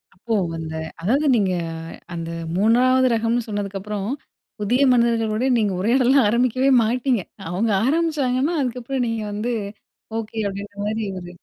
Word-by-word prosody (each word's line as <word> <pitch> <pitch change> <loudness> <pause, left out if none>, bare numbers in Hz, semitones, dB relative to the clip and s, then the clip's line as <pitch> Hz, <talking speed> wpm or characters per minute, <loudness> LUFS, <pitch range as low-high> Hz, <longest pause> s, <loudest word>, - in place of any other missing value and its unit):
அப்போ 225 +5 -4 0.2
அந்த 160 -1 -5 0.3
அதாவது 260 - +1
நீங்க 195 -4 +2 0.6
அந்த 165 -1 -4 0.3
3 255 +5 +4
ரகம்ன்னு 230 +1 0
சொன்னதக்கப்புறம், 205 0 -4 0.5
புதிய 245 +6 +1
மனிதர்களோடு 230 -1 +2
நீங்க 210 -3 +1
உரையாடல்லாம் 250 +5 +4
ஆரம்பிக்கவே 255 +3 +2
மாட்டீங்க. 240 -2 0 0.3
அவங்க 210 +5 0
ஆரம்பிச்சாங்கன்னா, 300 -1 +1
அதுக்கப்பறம் 250 +1 -2
நீங்க 230 -1 -2
வந்து 215 +4 -2 0.6
ஓகே 225 0 -6
அப்படின்ற 200 +1 -6
மாரி 220 +1 -1 0.2
ஒரு 175 -1 -9
230 Hz, 120 wpm, -22 LUFS, 205-255 Hz, 0.6 s, 3